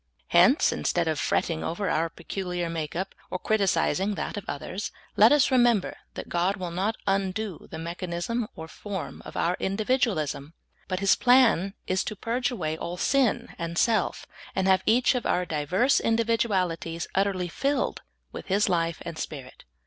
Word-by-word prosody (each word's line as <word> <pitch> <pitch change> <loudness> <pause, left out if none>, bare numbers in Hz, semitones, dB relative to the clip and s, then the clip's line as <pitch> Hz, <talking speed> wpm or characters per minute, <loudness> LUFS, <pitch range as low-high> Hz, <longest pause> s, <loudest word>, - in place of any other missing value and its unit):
Hence, - - +5
instead - - 0
of - - 0
fretting 80 - 0
over 195 +4 -2
our 165 0 +1
peculiar 175 0 -4
make 160 -2 -4
up, 190 +3 -3 0.2
or - - -2
criticising 195 -1 +1
that - - -4
of 205 - -5
others, 185 +8 -4 0.2
let 215 +3 +7
us 295 -2 +4
remember 240 -6 +3 0.2
that - - -6
God 175 +3 +1
will 180 -3 -4
not 195 +6 -1
undo 195 0 -1
the - - -7
mechanism 175 +7 -3
or 160 - -7
form 195 +2 -6
of - - -8
our 175 +2 +1
individualism, 190 - -1 0.3
but 185 0 -2
His 195 - +5
plan 235 -6 +4
is 185 0 0
to 215 - -4
purge 240 +4 -1
away 160 -10 -2
all 170 +2 -5
sin 240 0 +1
and 170 0 -4
self, 220 -3 +1 0.3
and 190 0 +1
have 190 0 +4
each 240 +4 +4
of 250 -3 -2
our 180 - +1
diverse 175 - +2
individualities 195 -8 0
ut 195 +1 +3
terly 185 -2 -2
filled 275 - -1 0.3
with - - -8
His 200 +2 +2
life 170 -3 0
and 170 -2 -6
Spirit. 135 -4 -7
190 Hz, 165 wpm, -26 LUFS, 170-220 Hz, 0.3 s, let